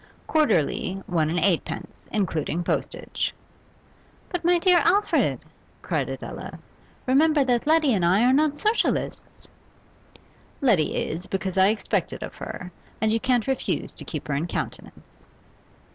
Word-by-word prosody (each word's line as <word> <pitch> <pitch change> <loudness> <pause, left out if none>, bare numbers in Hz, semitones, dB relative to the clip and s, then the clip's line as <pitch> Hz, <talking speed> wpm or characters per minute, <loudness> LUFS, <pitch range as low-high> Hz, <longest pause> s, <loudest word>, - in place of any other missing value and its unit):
Quarterly, 195 - +1
one 160 -4 +1
and 170 - -1
eightpence, 175 0 0 0.2
including 175 -4 -1
postage.' - - -2 1.0
'But, 355 -2 -3
my 350 +1 +4
dear 355 0 +5
Alfred,' 400 +5 +2 0.4
cried - - -1
Adela, - - -7 0.5
'remember 295 +3 +4
that 245 0 0
Letty 310 -4 +4
and 190 -4 +1
I 185 +6 +4
are 255 +1 +5
not 295 +1 +3
Socialists!' 430 +9 -1 1.1
'Letty 210 - +2
is, 175 +4 -3
because 190 -1 -3
I 190 0 +5
expect 215 +1 0
it - - -6
of - - -7
her, 180 0 -7 0.3
and 220 0 +2
you 225 - +2
can't 245 -2 +1
refuse 265 -1 -2
to - - -7
keep 155 -3 -6
her 145 - -1
in 150 +5 -1
countenance. - - -7
225 Hz, 140 wpm, -25 LUFS, -, 1.1 s, dear